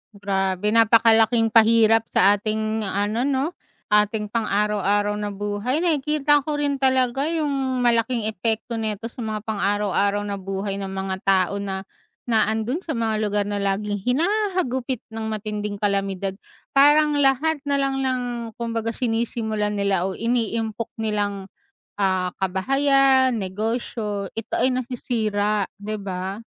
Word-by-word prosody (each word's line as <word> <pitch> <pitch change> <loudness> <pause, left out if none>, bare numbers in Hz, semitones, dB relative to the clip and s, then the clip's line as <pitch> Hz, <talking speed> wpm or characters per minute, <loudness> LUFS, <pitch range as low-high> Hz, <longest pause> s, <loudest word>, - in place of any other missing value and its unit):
Grabe 195 0 -1
napakalaking 225 0 +4
pahirap 225 0 +5
sa 200 +1 +4
ating 215 +1 -2
ano 205 +4 -1
'no? 270 -1 +1 0.5
Ating 210 +1 +2
pang 225 -1 -1
araw-araw 205 0 +1
na 210 0 -3
buhay, 205 +6 -2
nakikita 300 -3 +2
ko 295 +1 -3
rin 285 -2 -1
talaga 260 +2 +2
yung 275 -6 -1
malaking 230 -1 +1
epekto 220 +2 -2
nito 215 -1 -3
sa 235 +1 -7
mga 215 -1 -4
pang 215 -2 -3
araw-araw 205 0 +1
na 200 -1 -4
buhay 195 +1 -3
ng 195 - -4
mga 190 0 -3
tao 195 +1 +2
na 190 -1 -4 0.4
na 225 -3 +2
ando'n 225 +9 -1
sa 315 -8 -4
mga 220 -2 0
lugar 205 -1 0
na 205 0 -2
laging 200 +1 -1
hinahagupit 285 - 0 0.2
ng 220 0 -4
matinding 210 -1 -4
kalamidad. 195 -1 -1 0.4
Parang 295 +2 +5
lahat 285 +3 +2
nalang 275 -2 0
ng 260 -1 0 0.4
kumbaga 230 -1 -2
sinisimulan 225 -3 -1
nila 195 -2 +1
o 190 - -6
iniimpok 230 -1 -1
nilang, 205 -3 -2 0.5
ah, 185 -2 +1
kabahayan, 265 +7 +3
negosyo, 210 0 -3
ito 225 - -6
ay - - +4
nasisira, 220 -5 -1 0.2
di 215 +1 -4
ba? 190 -1 -4
220 Hz, 135 wpm, -23 LUFS, 205-250 Hz, 0.5 s, pahirap